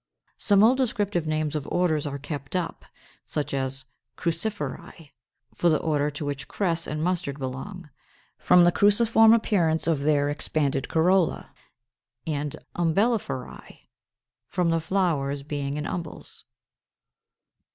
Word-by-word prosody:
Some 200 Hz, -1 st, +4 dB
old 245 Hz, +4 st, +5 dB
descriptive 205 Hz, -9 st, -1 dB
names 155 Hz, -1 st, -1 dB
of 150 Hz, -2 st, -3 dB
orders 160 Hz, -5 st, +1 dB
are 140 Hz, 0 st, -4 dB
kept 145 Hz, +1 st, -6 dB
up, 180 Hz, -2 st, -3 dB, 0.4 s
such 150 Hz, -2 st, -3 dB
as 135 Hz, 0 st, -3 dB, 0.3 s
Cruciferæ 170 Hz, -2 st, -4 dB, 0.4 s
for 175 Hz, -, +2 dB
the 155 Hz, -, +3 dB
order 150 Hz, -2 st, 0 dB
to 145 Hz, 0 st, -6 dB
which 145 Hz, -1 st, -4 dB
Cress 170 Hz, -4 st, -1 dB
and 150 Hz, +1 st, -3 dB
Mustard 175 Hz, -5 st, -1 dB
belong, 145 Hz, +7 st, -6 dB, 0.5 s
from 180 Hz, -, +5 dB
the 175 Hz, -, +5 dB
cruciform 220 Hz, +3 st, +5 dB
appearance 180 Hz, -8 st, +2 dB
of 165 Hz, -4 st, +1 dB
their 145 Hz, 0 st, +2 dB
expanded 145 Hz, -2 st, -1 dB
corolla, 175 Hz, +1 st, +1 dB, 0.7 s
and 150 Hz, -2 st, -3 dB, 0.2 s
Umbelliferæ, 175 Hz, -, -1 dB, 0.7 s
from 175 Hz, -2 st, 0 dB
the 165 Hz, -, +2 dB
flowers 155 Hz, -6 st, 0 dB
being 145 Hz, -1 st, -3 dB
in 150 Hz, -, -3 dB
umbels. 170 Hz, -3 st, -7 dB
160 Hz, 125 wpm, -25 LUFS, 145-185 Hz, 0.7 s, old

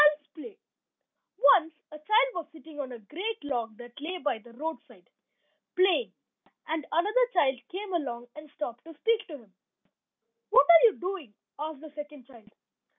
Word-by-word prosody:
CHILD'S 295 Hz, 0 st, +5 dB
PLAY 400 Hz, +6 st, -11 dB, 0.8 s
Once 310 Hz, +3 st, +5 dB, 0.2 s
a 305 Hz, -, -10 dB
child 435 Hz, +10 st, +4 dB
was 340 Hz, -4 st, -5 dB
sitting 315 Hz, -1 st, -13 dB
on 265 Hz, -3 st, -4 dB
a 245 Hz, -, -7 dB
great 375 Hz, -, -5 dB
log 235 Hz, -6 st, -3 dB
that 240 Hz, +2 st, -12 dB
lay 350 Hz, +5 st, -4 dB
by 280 Hz, -8 st, -1 dB
the 235 Hz, +2 st, -16 dB
roadside, 275 Hz, -, -7 dB, 0.7 s
playing; 375 Hz, +6 st, +3 dB, 0.6 s
and 315 Hz, -1 st, -3 dB
another 425 Hz, +9 st, +3 dB
child 270 Hz, -7 st, +3 dB
came 385 Hz, +1 st, -6 dB
along, 245 Hz, -8 st, -2 dB
and 305 Hz, 0 st, -11 dB
stopped 245 Hz, -5 st, -6 dB
to 330 Hz, -1 st, -11 dB
speak 450 Hz, +6 st, +1 dB
to 325 Hz, -, -10 dB
him. 215 Hz, -7 st, -20 dB, 1.0 s
"What -, -, +7 dB
are 340 Hz, +5 st, +9 dB
you 435 Hz, -, +1 dB
doing?" 355 Hz, -, -5 dB, 0.2 s
asked 305 Hz, -1 st, -5 dB
the 315 Hz, -1 st, -10 dB
second 295 Hz, -3 st, -9 dB
child. 230 Hz, -5 st, -17 dB
305 Hz, 165 wpm, -29 LUFS, 265-355 Hz, 1.0 s, are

